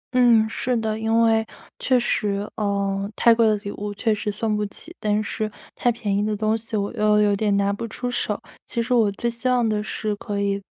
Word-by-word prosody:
嗯， 235 Hz, -3 st, +5 dB
是 245 Hz, +2 st, -1 dB
的， 220 Hz, -1 st, -1 dB
因 225 Hz, +1 st, +2 dB
为 225 Hz, -1 st, +4 dB, 0.4 s
确 255 Hz, -1 st, +3 dB
实， 205 Hz, -3 st, 0 dB
呃， 200 Hz, -1 st, -1 dB
太 235 Hz, -1 st, +5 dB
贵 230 Hz, -1 st, +3 dB
的 215 Hz, -, +3 dB
礼 200 Hz, 0 st, -6 dB
物 205 Hz, 0 st, -5 dB
确 220 Hz, +1 st, +1 dB
实 210 Hz, 0 st, -2 dB
送 215 Hz, +1 st, -1 dB
不 210 Hz, -, -1 dB
起， 330 Hz, -, -9 dB
但 210 Hz, 0 st, +1 dB
是 215 Hz, +1 st, -3 dB, 0.2 s
太 245 Hz, -, +2 dB
便 210 Hz, -4 st, -2 dB
宜 205 Hz, -, +1 dB
的 210 Hz, 0 st, 0 dB
东 215 Hz, +1 st, +1 dB
西 225 Hz, -1 st, -4 dB
我 200 Hz, +2 st, -2 dB
又 210 Hz, -1 st, +3 dB
有 205 Hz, -1 st, +3 dB
点 205 Hz, 0 st, +1 dB
拿 200 Hz, 0 st, +1 dB
不 230 Hz, +3 st, -4 dB
出 245 Hz, +3 st, -4 dB
手。 -, -, -1 dB, 0.3 s
其 235 Hz, -, -3 dB
实 235 Hz, +2 st, 0 dB
我 220 Hz, -4 st, +4 dB
最 235 Hz, +4 st, -3 dB
希 235 Hz, +2 st, -2 dB
望 245 Hz, -2 st, +3 dB
的 215 Hz, -1 st, 0 dB
是 210 Hz, 0 st, -3 dB
可 205 Hz, -1 st, -4 dB
以， 200 Hz, 0 st, 0 dB
215 Hz, 245 characters per minute, -23 LUFS, 205-230 Hz, 0.4 s, 嗯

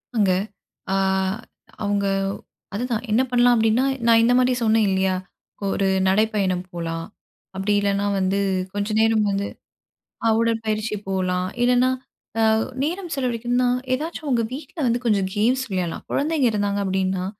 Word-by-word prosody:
அங்க 205 Hz, -4 st, +3 dB, 0.6 s
ஆ -, -, +2 dB, 0.9 s
அவுங்க 200 Hz, -1 st, 0 dB, 0.7 s
அதுதான், 230 Hz, +1 st, -2 dB
என்ன 235 Hz, +4 st, +4 dB
பண்ணலாம் 245 Hz, 0 st, +5 dB
அப்டின்னா, 225 Hz, +3 st, +3 dB, 0.2 s
நான் 230 Hz, 0 st, +6 dB
இந்த 245 Hz, +1 st, +4 dB
மாரி 255 Hz, 0 st, +3 dB
சொன்னேன் 220 Hz, -1 st, +3 dB
இல்லையா? 190 Hz, 0 st, +1 dB, 0.5 s
ஒரு 195 Hz, 0 st, 0 dB, 0.2 s
நடைப்பயணம் 195 Hz, -3 st, +1 dB
போலாம், 165 Hz, -1 st, -4 dB, 0.5 s
அப்டி 200 Hz, +2 st, 0 dB
இல்லைனா 200 Hz, 0 st, 0 dB
வந்து, 190 Hz, +1 st, +1 dB, 0.3 s
கொஞ்ச 205 Hz, 0 st, -2 dB
நேரம் 225 Hz, -1 st, +3 dB
வந்து 200 Hz, +1 st, -1 dB, 0.8 s
அ -, -, +5 dB
உடற்பயிற்சி 220 Hz, -2 st, -1 dB
போலாம், 185 Hz, -1 st, 0 dB
இல்லைனா 250 Hz, +1 st, +4 dB, 0.5 s
அ -, -, +3 dB, 0.4 s
நேரம் 350 Hz, +2 st, -3 dB
செலவழிக்கணும்னா 245 Hz, -1 st, 0 dB, 0.3 s
ஏதாச்சும் 315 Hz, +1 st, -4 dB
உங்க 240 Hz, -3 st, +2 dB
வீட்ல 280 Hz, +4 st, -8 dB
வந்து 235 Hz, +1 st, +2 dB
கொஞ்சம் 200 Hz, -5 st, +2 dB
கேம்ஸ் 245 Hz, +5 st, +2 dB
விளையாட்லாம். 180 Hz, -3 st, -3 dB
கொழந்தைங்க 295 Hz, -2 st, +1 dB
இருந்தாங்க 205 Hz, -1 st, 0 dB
அப்டின்னா, 190 Hz, -1 st, 0 dB
215 Hz, 130 wpm, -23 LUFS, 195-245 Hz, 0.9 s, நான்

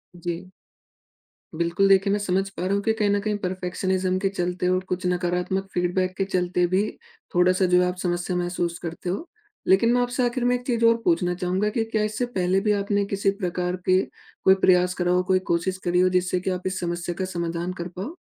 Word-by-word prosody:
जी। 175 Hz, +1 st, -5 dB, 1.0 s
बिल्कुल, 170 Hz, +4 st, +2 dB
देखिए 195 Hz, +1 st, +4 dB
मैं 205 Hz, -, +1 dB
समझ 195 Hz, 0 st, 0 dB
पा 190 Hz, -2 st, -5 dB
रहा 190 Hz, -, 0 dB
हूँ 200 Hz, -, +1 dB
कि 220 Hz, -, +2 dB
कहीं 210 Hz, -1 st, +2 dB
न 205 Hz, 0 st, +2 dB
कहीं 210 Hz, 0 st, -1 dB
परफेक्शनिज़्म 185 Hz, 0 st, -1 dB
के 195 Hz, 0 st, +1 dB
चलते 180 Hz, -1 st, -2 dB
और 185 Hz, 0 st, +1 dB
कुछ 180 Hz, +1 st, -2 dB
नकारात्मक 180 Hz, +2 st, -1 dB
फीडबैक 185 Hz, +1 st, 0 dB
के 195 Hz, -, 0 dB
चलते 180 Hz, -2 st, 0 dB
भी 185 Hz, +3 st, +2 dB, 0.5 s
थोड़ा-सा 185 Hz, +1 st, +4 dB
जो 180 Hz, 0 st, +6 dB
आप 180 Hz, -, -2 dB
समस्या 175 Hz, 0 st, -1 dB
महसूस 175 Hz, -1 st, -2 dB
करते 170 Hz, +1 st, -5 dB
हो। 200 Hz, -, -3 dB, 0.4 s
लेकिन 195 Hz, +5 st, +4 dB
मैं 245 Hz, -, +3 dB
आपसे 245 Hz, +1 st, 0 dB
आखिर 245 Hz, +1 st, -1 dB
में 245 Hz, 0 st, +3 dB
एक 245 Hz, 0 st, -6 dB
चीज़ 235 Hz, -2 st, +2 dB
और 230 Hz, 0 st, +5 dB
पूछना 175 Hz, 0 st, +2 dB
चाहूँगा 185 Hz, +4 st, 0 dB
कि 225 Hz, -, +2 dB
क्या 215 Hz, -1 st, +1 dB
इससे 215 Hz, +3 st, -1 dB
पहले 190 Hz, -5 st, 0 dB
भी 210 Hz, +1 st, +1 dB
आपने 200 Hz, 0 st, 0 dB
किसी 200 Hz, 0 st, 0 dB
प्रकार 180 Hz, 0 st, -1 dB
के 185 Hz, 0 st, +4 dB, 0.4 s
कोई 190 Hz, -, +6 dB
प्रयास 180 Hz, -1 st, +3 dB
करा 175 Hz, -1 st, 0 dB
हो, 180 Hz, 0 st, +3 dB
कोई 185 Hz, 0 st, +2 dB
कोशिश 170 Hz, +2 st, 0 dB
करी 180 Hz, 0 st, +1 dB
हो। 185 Hz, 0 st, +4 dB
जिससे 180 Hz, 0 st, +1 dB
कि 185 Hz, -, -3 dB
आप 185 Hz, 0 st, -2 dB
इस 185 Hz, 0 st, -2 dB
समस्या 175 Hz, 0 st, -3 dB
का 190 Hz, -, 0 dB
समाधान 170 Hz, 0 st, -3 dB
कर 175 Hz, -1 st, -5 dB
पाओ? 200 Hz, -, -5 dB
185 Hz, 215 wpm, -24 LUFS, 180-195 Hz, 1.0 s, जो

